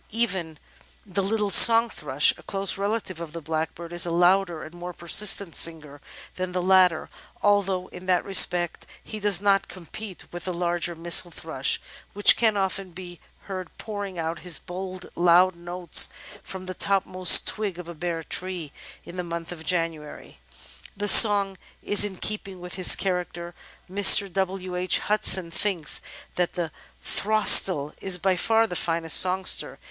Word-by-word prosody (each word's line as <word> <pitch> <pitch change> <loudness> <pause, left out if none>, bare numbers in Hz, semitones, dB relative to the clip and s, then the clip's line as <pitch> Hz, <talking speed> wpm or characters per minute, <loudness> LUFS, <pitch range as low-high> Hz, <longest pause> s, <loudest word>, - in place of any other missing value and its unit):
Even 190 -8 -4 0.5
the 195 0 -4
little 205 +1 -2
Song 230 +2 +7
Thrush, 145 - 0
a - - -17
close 195 0 -4
relative 200 -3 -5
of 165 -2 -9
the 170 - -7
Blackbird, 160 +2 -6
is 175 - -2
a 175 - -3
louder 175 0 0
and 160 - -12
more 175 +1 -9
persistent 190 +1 +1
singer 150 -3 -2 0.4
than 185 0 -5
the 180 - -3
latter, 185 -3 +2 0.4
although 195 -3 0
in 180 +1 -13
that 180 -1 0
respect 180 -3 +2 0.2
he 215 - -9
does 205 -4 +3
not 200 -1 0
compete 185 +2 -10
with 175 0 -9
the 185 - -4
larger 175 0 -3
Missel 170 +2 -1
Thrush, 160 -5 -3 0.3
which 205 0 +5
can 220 -3 0
often 190 0 -3
be 175 -1 -11 0.2
heard 185 -3 -8
pouring 205 -4 -8
out 165 0 -5
his 170 +1 +2
bold 185 +1 -9
loud 175 +1 +2
notes 175 0 +1 0.3
from 190 -1 -10
the 185 - -7
topmost 185 -2 +2
twig 205 -5 -1
of 180 -1 -10
a 170 - -9
bare 165 0 -6
tree 180 -4 -6 0.3
in 175 - -12
the 180 - -4
month 170 0 -7
of 165 -2 -10
January. 165 -3 -5 0.6
The 205 +1 -4
song 200 -3 +6 0.3
is 205 0 +3
in 205 -2 -5
keeping 195 -1 -5
with 180 0 -11
his 185 -1 +7
character. 180 -2 -5 0.3
Mr. 195 0 +5
W. 190 -1 -4
H. 180 +1 +1
Hudson 190 -4 +2
thinks 175 -4 -1 0.4
that 180 -1 -2
"The 170 -3 -5 0.3
Throstle 195 -8 +3
is 190 -2 +2
by 190 +1 -1
far 225 +5 +1
the 180 - -7
finest 165 -1 +1
songster. 185 +1 +1
180 Hz, 160 wpm, -23 LUFS, 170-195 Hz, 0.6 s, Song